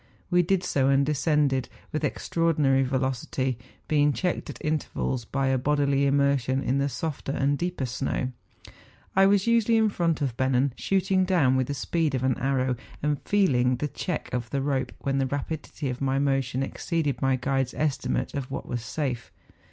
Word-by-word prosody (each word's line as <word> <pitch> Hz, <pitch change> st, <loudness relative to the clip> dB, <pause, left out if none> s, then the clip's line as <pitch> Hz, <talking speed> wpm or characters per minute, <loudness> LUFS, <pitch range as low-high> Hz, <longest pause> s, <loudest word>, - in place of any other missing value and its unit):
We 180 Hz, 0 st, +5 dB
did 185 Hz, +1 st, +1 dB
so, 135 Hz, -6 st, +1 dB
and 140 Hz, 0 st, +4 dB
descended 145 Hz, -3 st, +1 dB, 0.2 s
with 155 Hz, -, -2 dB
extraordinary 150 Hz, -2 st, +1 dB
velocity, 130 Hz, -1 st, -1 dB, 0.3 s
being 145 Hz, -1 st, +3 dB
checked 180 Hz, +3 st, -2 dB
at -, -, -6 dB
intervals 145 Hz, -5 st, -1 dB
by 135 Hz, +2 st, 0 dB
a 130 Hz, -1 st, +2 dB
bodily 140 Hz, 0 st, +2 dB
immersion 140 Hz, -1 st, +2 dB
in 135 Hz, +2 st, +1 dB
the 140 Hz, +1 st, +1 dB
softer 140 Hz, +1 st, -4 dB
and 140 Hz, +1 st, +1 dB
deeper 175 Hz, -3 st, -2 dB
snow. 130 Hz, +1 st, -2 dB, 0.8 s
I 195 Hz, 0 st, +6 dB
was 200 Hz, -1 st, +3 dB
usually 230 Hz, -1 st, +3 dB
in 220 Hz, -1 st, +4 dB
front 170 Hz, -5 st, 0 dB
of 130 Hz, -4 st, -1 dB
Bennen, 130 Hz, +1 st, +2 dB
shooting 190 Hz, 0 st, +1 dB
down 170 Hz, -9 st, +3 dB
with 130 Hz, -1 st, +1 dB
the 145 Hz, -, -3 dB
speed 155 Hz, +1 st, 0 dB
of 130 Hz, -, -2 dB
an 130 Hz, -2 st, +1 dB
arrow, 130 Hz, -1 st, 0 dB, 0.3 s
and 150 Hz, -2 st, 0 dB
feel¬ 200 Hz, -7 st, +3 dB
ing 125 Hz, +1 st, +3 dB
the 150 Hz, +4 st, -2 dB
check 180 Hz, +3 st, -4 dB
of 120 Hz, -2 st, -2 dB
the 135 Hz, +1 st, -1 dB
rope 135 Hz, -3 st, -1 dB
when 135 Hz, 0 st, 0 dB
the 135 Hz, -, +1 dB
rapidity 145 Hz, +2 st, -4 dB
of 125 Hz, -, -7 dB
my 135 Hz, 0 st, +1 dB
motion 135 Hz, -2 st, 0 dB
exceeded 145 Hz, -2 st, -2 dB
my 135 Hz, 0 st, +3 dB
guide's 135 Hz, 0 st, -1 dB
estimate 150 Hz, -3 st, -1 dB
of 140 Hz, -3 st, -4 dB
what 135 Hz, -, -5 dB
was 120 Hz, -2 st, -3 dB
safe. 125 Hz, -5 st, -3 dB
140 Hz, 180 wpm, -26 LUFS, 130-155 Hz, 0.8 s, I